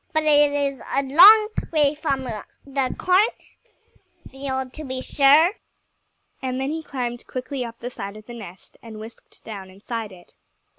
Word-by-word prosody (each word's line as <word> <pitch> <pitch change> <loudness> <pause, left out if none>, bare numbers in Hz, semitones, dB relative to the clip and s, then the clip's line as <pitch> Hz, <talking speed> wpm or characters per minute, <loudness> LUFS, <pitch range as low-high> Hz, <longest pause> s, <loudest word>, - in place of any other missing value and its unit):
"But 315 0 +1
it 295 -1 +5
is 280 -3 -2
a 275 - +2
long 400 +10 +8 0.2
way 300 -3 +3
from 285 -3 -2
the 260 +3 -4
cornfield, 270 - -3
to 310 - -8
be 260 -2 -5
sure." 290 +6 +5 0.9
And 255 0 -3
then 270 +2 -2
he 320 +1 -3
climbed 245 -5 -5
quickly 255 +1 -4
up 230 -1 -8
the 245 +1 -5
side 200 -2 -7
of 215 - -14
the 240 - -10
nest 195 -6 -12
and 220 -2 -10
whisked 220 +2 -13
down 200 -4 -8
inside 215 +3 -6
it. 175 -2 -16
265 Hz, 155 wpm, -23 LUFS, 230-290 Hz, 0.9 s, long